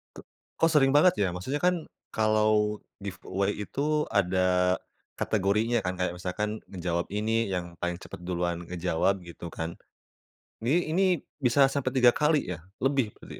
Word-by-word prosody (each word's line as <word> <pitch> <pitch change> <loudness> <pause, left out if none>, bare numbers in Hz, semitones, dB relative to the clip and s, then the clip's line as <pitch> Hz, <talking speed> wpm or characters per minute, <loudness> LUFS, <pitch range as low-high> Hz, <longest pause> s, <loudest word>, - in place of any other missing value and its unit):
K - - -12 0.4
kok 165 - +4
sering 135 -2 +5
banget, 150 +5 +6
ya? 95 - +3
Maksudnya 115 +12 -3
kan, 180 -3 +2 0.3
kalau 110 -1 +2 0.2
giveaway 100 +1 -2
itu 150 +6 0
ada 90 -1 +2 0.4
kategorinya 110 +3 +1
kan, 90 - 0
kayak 90 - 0
misalkan 95 +4 -2 0.2
ngejawab 85 -2 -2
ini 110 +1 +1
yang 85 -1 -4
paling 90 0 -1
cepet - - -9
duluan 85 -1 -2
ngejawab, 90 +2 0
gitu 85 0 -9
kan? 80 +1 -5 0.9
Ini 155 +5 +1
ini, 190 +1 +4 0.4
bisa 135 +3 +5
sampai 135 -2 -1
3 120 -1 +7
kali, 150 - +2
ya? - - -12 0.2
Lebih 135 -5 +1
berarti, - - -10
105 Hz, 150 wpm, -28 LUFS, 90-135 Hz, 0.9 s, 3